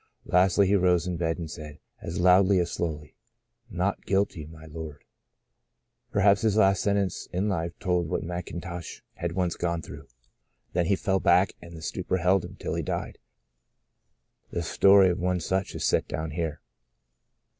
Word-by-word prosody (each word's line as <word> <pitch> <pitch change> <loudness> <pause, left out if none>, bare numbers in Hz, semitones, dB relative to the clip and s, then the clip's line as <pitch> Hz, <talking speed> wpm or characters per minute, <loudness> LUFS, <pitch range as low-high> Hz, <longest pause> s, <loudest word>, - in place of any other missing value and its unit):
Lastly, 95 +2 +4
he 100 +2 +3
rose 90 -2 +3
in 90 -1 -2
bed 80 -1 -1
and 85 -2 -5
said, 75 -2 -9 0.2
as 85 +2 -4
loudly 95 +2 +5
as 85 -1 0
slowly: 75 -3 -4 0.3
* 115 +1 -53
Not 95 0 -1
guilty, 95 -6 0
my 80 0 -13
Lord 80 -2 -8
T - - -34 0.7
" - - -50
Perhaps 100 0 +4
his 110 -2 +2
last 95 -2 +4
sen 100 -1 +1
tence 100 -3 -2
in 95 +4 -1
life 85 -4 -2
told 90 -2 0
what - - -1
Mcintosh 85 0 -6 0.2
had 85 0 -3
once 90 -2 0
gone 85 -2 -2
through. - - -10 0.7
Then 85 -1 +1
he 100 - +3
fell 95 -1 0
back 90 +2 +4
and 85 -1 -11
the 80 - -10
stupor 95 - -2
held 90 +1 +2
him - - -9
till - - -4
he - - -1
died. - - -4 1.3
The 85 - -3
story 95 +2 +5
of 90 - -3
one 90 0 0
such 95 +3 -2
is - - -2
set - - +2
down 80 0 -4
here. 80 -1 -3
90 Hz, 180 wpm, -27 LUFS, 85-95 Hz, 1.3 s, loudly